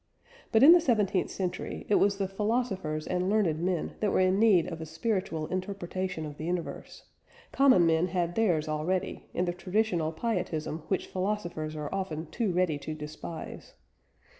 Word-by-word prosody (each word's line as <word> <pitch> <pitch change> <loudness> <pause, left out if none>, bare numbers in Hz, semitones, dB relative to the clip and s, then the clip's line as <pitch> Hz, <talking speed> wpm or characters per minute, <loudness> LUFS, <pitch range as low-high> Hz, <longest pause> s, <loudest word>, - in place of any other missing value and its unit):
But, 220 - +5
in 305 - +10
the 350 0 +8
seventeenth 210 - +1
century, 185 -1 -4
it - - +1
was 200 0 +3
the 195 -1 -1
philosophers 195 -6 -1
and 180 +1 -1
learned 195 -7 +2
men 175 -1 -2
that 210 -2 +1
were - - +2
in 185 +1 +3
need 205 -7 +5
of 165 -2 -6
a - - -4
spiritual 165 -1 -2
interpretation 185 -2 -3
of 150 -1 -8
the - - -6
universe; 175 0 -4 0.5
common 260 -11 +5
men 165 +2 +3
had 175 -1 -1
theirs 175 -9 +1
already, 155 +5 -2
in 180 - +1
the 175 - -1
traditional 180 -3 0
pietism 160 -5 -2
which 190 - -1
philosophers 185 -5 -3
are 150 +1 -5
often 170 -5 -3
too 220 -2 0
ready 175 -4 +1
to 155 +2 -5
despise. 155 +2 -8
180 Hz, 165 wpm, -29 LUFS, 160-200 Hz, 0.5 s, in